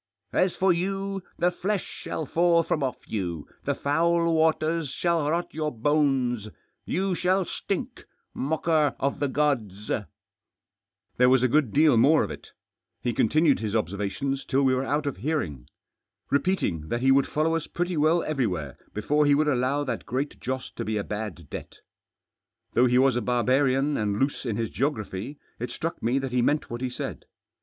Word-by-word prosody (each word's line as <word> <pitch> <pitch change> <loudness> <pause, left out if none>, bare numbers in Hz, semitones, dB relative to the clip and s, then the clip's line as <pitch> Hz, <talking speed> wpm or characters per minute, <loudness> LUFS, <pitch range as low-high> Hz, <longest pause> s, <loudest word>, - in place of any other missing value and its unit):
As 185 -1 +2
for 190 -1 +3
you, 195 +2 -2 0.2
the 175 +1 +2
flesh 195 +2 -1
shall 160 - -5
fall 170 +2 +3
from 155 - -1
off 130 -2 -3
you; 85 -7 -3 0.2
the - - 0
foul 170 +3 +2
waters 160 -1 +1
shall 165 0 0
rot 170 +2 -1
your 155 -1 -2
bones; 130 -4 +1 0.4
you 190 +1 0
shall 185 +2 +1
stink! - - -4 0.3
Mocker 155 -1 +1
of 140 +1 -1
the 145 - +1
gods! 120 -9 -1 0.6
" - - -52
There 125 0 +5
was 130 -1 +4
a - - +5
good 135 -2 +2
deal 150 -4 +5
more 150 +7 +5
of - - -4
it. - - -9 0.5
He 120 - 0
continued 150 +6 +3
his 110 -1 -3
observations 105 - -2
till 140 +1 +1
we 130 -1 +4
were 130 +1 0
out 145 +1 0
of 140 -8 -2
hearing. 95 - -2 0.6
Repeat 185 +7 +1
ing 80 -2 -2
that 120 - -1
he 135 +1 +4
would 135 0 +4
follow 160 +2 +1
us 165 - -2
pretty 175 +1 -2
well 160 +3 +3
everywhere 95 - -2 0.2
before 150 +8 +2
he 145 - +5
would 150 +1 +2
allow 135 +1 +1
that 135 - -4
Great 135 +3 -3
Joss 130 0 -4
to 115 - -2
be 110 -1 -2
a 100 - -1
bad 105 -7 -5
debt. - - -7 1.0
Though 125 +1 +5
he 125 0 +3
was 130 -1 +4
a 120 - 0
barbarian 130 +4 +2
and 105 -2 0
loose 135 -1 -1
in 110 - -1
his 115 0 -2
geo 140 +3 +1
graphy, 110 +1 -6 0.2
it 120 +1 -3
struck 165 +7 -4
me 120 +4 +1
that 135 -1 -2
he 125 0 +2
meant 145 +3 +1
what 120 +1 -4
he 130 - -1
said. 125 - -6
140 Hz, 185 wpm, -26 LUFS, 120-160 Hz, 1.0 s, There